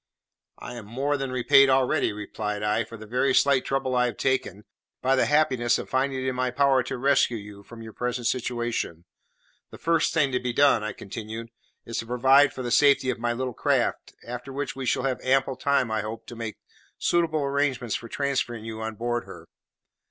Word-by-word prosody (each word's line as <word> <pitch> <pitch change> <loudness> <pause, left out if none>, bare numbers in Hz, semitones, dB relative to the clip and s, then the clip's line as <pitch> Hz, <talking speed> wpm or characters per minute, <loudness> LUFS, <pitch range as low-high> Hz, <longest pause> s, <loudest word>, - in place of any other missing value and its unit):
"I - - -8
am 110 -3 -9
more 135 +6 -1
than 135 -2 -3
repaid 135 +2 +5
already," 130 -1 +2
replied 105 0 -4
I, 105 +2 +1
"for 115 - -10
the 110 - -10
very 125 +4 +1
slight 140 -2 +3
trouble 135 -1 -1
I 125 0 +3
have 120 - -5
taken, 125 -7 -1 0.4
by 135 +1 +2
the 130 - +2
happiness 130 -6 +2
of - - -7
finding 130 0 0
it - - -1
in 130 - 0
my 125 0 0
power 135 0 +3
to 125 - -5
rescue 135 -2 +2
you 100 -1 -10
from 115 +3 -12
your 110 -1 -10
present 125 0 -3
situation. 120 -9 -2 0.6
The - - -11
first 165 -1 +1
thing 145 -4 +2
to 125 - 0
be 125 -1 -3
done," 140 -5 +4
I 110 -1 -3
continued, 110 +3 -7 0.3
"is 115 - -4
to 115 - -5
provide 135 +4 +5
for 130 - -6
the 120 - -3
safety 140 -1 +4
of 120 - -6
my 120 0 0
little 125 +1 -3
craft, - - 0
after 125 +3 -6
which 135 0 -4
we 135 -1 -5
shall 130 - +1
have 135 -2 -1
ample 135 0 +1
time, 130 -2 +1
I 110 -1 0
hope, 110 +2 -7
to 120 - -9
make 115 -2 -6 0.4
suitable 160 -3 +1
arrangements 140 -4 0
for 115 - -4
transferring 130 -5 -2
you 110 0 -6
on 110 0 -4
board 120 +1 -2
her. - - -11
125 Hz, 205 wpm, -26 LUFS, 115-135 Hz, 0.6 s, repaid